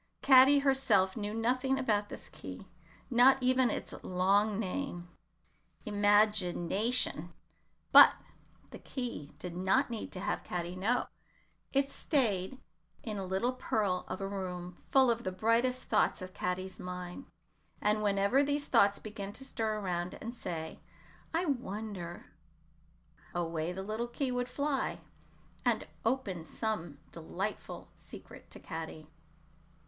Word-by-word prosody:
Caddy 270 +1 +8
herself 265 -9 +3
knew 210 -2 -3
nothing 255 +4 +1
about 210 -6 0
this - - -7
key, - - -9 0.5
not 250 +3 +7
even 255 -1 +3
its - - -4
long 200 +3 +2
name 185 -4 -4 0.8
Im 205 -1 -3
ag 210 0 +5
i 175 - -2
na 195 +6 -1
tion. 175 -9 +1 0.6
But - - +10 0.6
the - - -9
key 235 - -6
did 170 +2 -7
not 195 +9 +2
need 225 - -4
to 185 - -5
have 200 - -2
Caddy 175 0 -4
know; 220 +7 +1 0.7
it 275 0 +1
staid 240 - 0 0.4
in 215 -3 -4
a 195 - -3
little 190 +7 0
pearl 210 -7 -1
of 185 - -5
a 195 - -2
room 180 -3 -5
full 265 -3 +5
of 235 0 -2
the 185 - -2
brightest 230 +6 +1
thoughts - - +2
of 185 0 -9
Caddy's 185 +1 -3
mind, 180 +6 -7 0.5
and 210 +1 +1
whenever 200 +6 +3
these 285 0 0
thoughts 200 -6 +4
began 205 -2 -7
to 270 - -4
stir 220 -4 -2
about 180 -3 -3
and 230 +2 -7
say, 160 -9 -5 0.5
"I 335 +3 0
wonder," 205 - -4 1.1
away 165 -1 -1
the 190 +1 -5
little 215 +4 -3
key 255 +2 -2
would 245 0 -2
fly, 280 +1 -1 0.6
and - - +1 0.2
open 225 -8 -1
some 215 +1 -2
new 145 -3 -13
delightful 185 +5 -5
secret - - -13
to - - -7
Caddy. 160 -1 -7
210 Hz, 140 wpm, -32 LUFS, 185-250 Hz, 1.1 s, But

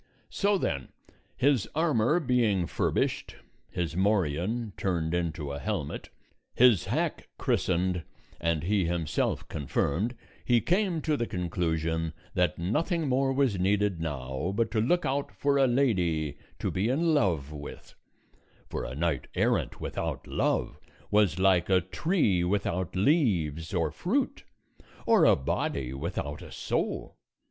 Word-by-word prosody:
So 200 0 +2
then, 70 - -2 0.5
his 130 -4 +2
armor 155 -2 +3
being 120 - +2
furbished, - - -1 0.3
his 85 -2 -3
morion 95 +3 0
turned 85 -4 -1
into 80 -4 -2
a 70 - -4
helmet, - - -3 0.5
his 120 -7 +5
hack - - -2
christened, 90 0 +1 0.4
and 85 -2 0
he 100 0 +2
himself 85 -3 -1
confirmed, 85 - -1 0.3
he 120 -1 +4
came 180 - +1
to 155 - +1
the 120 -4 -1
conclusion 80 -2 -1 0.2
that 90 -4 +1
nothing 155 - 0
more 135 +1 +2
was 130 -8 +1
needed 100 -1 +1
now 65 +1 -3
but 115 0 +1
to 110 - +1
look 175 +10 +2
out 140 +1 -1
for 140 -1 +1
a 135 - +5
lady 90 - +1 0.2
to - - -2
be 95 +4 0
in 160 +5 +2
love 85 - +1
with; 75 -1 -9 0.8
for - - -3
a - - -6
knight 80 -2 -1
errant - - +1
without - - -4
love - - -1 0.3
was 105 -5 +3
like 95 -2 +3
a 95 -1 +5
tree 95 - +1
without 95 -2 -1
leaves 95 - +1
or 85 -5 0
fruit, - - -1 0.6
or - - +5
a - - +7
body 65 -1 -2
without 75 0 -4
a - - -10
soul. - - -3
95 Hz, 135 wpm, -28 LUFS, 80-125 Hz, 0.8 s, a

